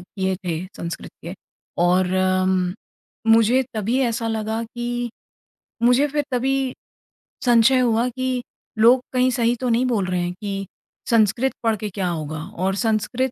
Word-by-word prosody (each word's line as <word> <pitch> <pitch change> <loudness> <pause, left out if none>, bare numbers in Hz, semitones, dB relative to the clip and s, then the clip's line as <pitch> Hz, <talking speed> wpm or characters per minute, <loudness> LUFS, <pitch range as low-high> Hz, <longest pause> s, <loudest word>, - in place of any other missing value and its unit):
किए 190 +1 -3
थे 170 0 -2
संस्कृत 170 0 -6
के। 175 +3 -6 0.5
और 180 +1 +3 1.2
मुझे 230 +3 +5
तभी 220 +5 0
ऐसा 230 -2 0
लगा 220 +1 -2
कि 240 +1 -4 0.7
मुझे 250 +4 +4
फ़िर 295 0 -1
तभी 265 +1 0 0.7
संशय 245 +2 +5
हुआ 235 -1 +2
कि 255 0 -2 0.4
लोग 245 +3 +6
कहीं 255 0 +3
सही 240 0 +1
तो 250 - 0
नहीं 240 +2 +2
बोल 220 -7 +1
रहे 180 -1 -1
हैं 175 0 -2
कि 195 -2 -4 0.4
संस्कृत 230 +3 +3
पढ़ 225 -1 +2
के 210 +1 -4
क्या 190 -1 -2
होगा 155 -2 -4 0.3
और 195 - +1
संस्कृत 235 +4 0
230 Hz, 145 wpm, -22 LUFS, 195-250 Hz, 1.2 s, लोग